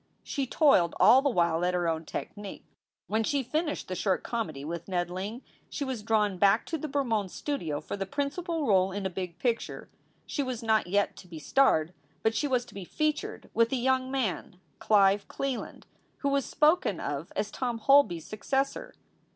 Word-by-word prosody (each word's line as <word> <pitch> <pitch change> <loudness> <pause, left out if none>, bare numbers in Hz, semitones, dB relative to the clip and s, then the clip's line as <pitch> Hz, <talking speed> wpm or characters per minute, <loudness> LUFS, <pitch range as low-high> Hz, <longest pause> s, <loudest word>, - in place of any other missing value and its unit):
She 275 -3 -2
toiled 240 - +4
all 260 - +7
the 285 - +2
while 170 -6 +1
at 180 0 +1
her 175 -1 0
own 160 0 -1
technic. 205 +4 -7 0.4
When 220 +1 0
she 275 +4 0
finished 305 +5 -2
the 185 - -4
short 185 +1 0
comedy 160 - -3
with 170 +1 -5
Ned 175 -2 -1
Ling 205 +7 -5 0.3
she 290 - -3
was 260 -5 -3
drawn 210 -3 +1
back 195 0 +4
to 325 - -3
the 310 - -4
Bermond 240 -9 0
Studio 170 - -3
for 155 - -6
the 195 -1 -4
principal 295 - -2
role 190 -4 +3
in 200 0 -4
a 190 - -1
big 180 -2 -5
picture. 235 +2 -2 0.3
She 290 - -2
was 255 -3 -3
not 220 -4 +2
yet 200 +3 +1
to 185 - -12
be 170 -2 -9
starred, 160 - +2 0.3
but 220 - +2
she 290 - 0
was 250 -3 +1
to 240 - -16
be 195 - -6
"featured" 305 - -2
with 230 0 +3
a - - +1
young 260 +1 +1
man, 225 -8 -2 0.2
Clive 200 -1 +4
Cleland, 275 -3 -4 0.4
who 280 - +1
was 275 -1 +1
spoken 300 - +2
of 145 +5 -4
as 210 - -2
Tom 245 -3 -2
Holby 250 -6 +5
s 160 - -11
successor. 270 +6 -2
220 Hz, 190 wpm, -29 LUFS, 185-270 Hz, 0.4 s, all